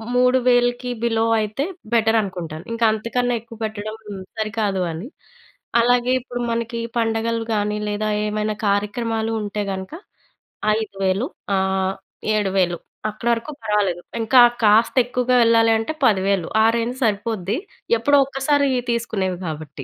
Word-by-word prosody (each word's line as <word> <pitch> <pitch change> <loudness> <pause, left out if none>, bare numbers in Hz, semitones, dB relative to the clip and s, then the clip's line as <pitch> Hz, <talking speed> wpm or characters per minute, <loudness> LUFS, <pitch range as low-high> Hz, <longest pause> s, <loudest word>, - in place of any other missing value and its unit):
3000కి 250 -1 +3
below 225 -1 +2
అయితే 215 +6 -2 0.3
better 225 -1 +3
అనుకుంటాను. 175 -5 -6
ఇంకా 230 0 +1
అంతకన్నా 240 +3 -1
ఎక్కువ 230 0 -13
పెట్టడం 215 0 -5 0.4
సరికాదు 215 -3 -1
అని. 165 +8 -6 0.7
అలాగే 245 +1 +3
ఇప్పుడు 245 0 -6
మనకి 230 0 -2 0.2
పండగలు 225 0 0
కాని 210 0 0
లేదా 210 +1 -1 0.2
ఏమైనా 210 0 -1
కార్యక్రమాలు 220 +2 0
ఉంటే 210 0 -3
గనక. 190 0 -6 0.9
5000 195 +1 -1 0.3
ఆహ్, 190 0 0 0.4
7000 190 -4 +1 0.3
అక్కడ 215 +3 -6
వరకు 230 +6 -4
పర్వాలేదు. 205 -5 0 0.2
ఇంకా 245 +3 +6 0.2
కాస్త 220 +2 +4
ఎక్కువగా 250 0 0
యేళ్ళాలి 230 -1 +5
అంటే 225 +8 -3
10,000 195 -5 +2 0.2
ఆ - - +5
రేంజ్ 235 +2 -2
సరిపోద్ది. 210 -1 -1 0.4
ఎప్పుడో 285 +6 +3
ఒక్కసారి 280 +1 +1 0.2
తీసుకునేవి 205 -6 -1
కాబట్టి. 150 -2 -6
220 Hz, 120 wpm, -21 LUFS, 200-235 Hz, 0.9 s, ఇంకా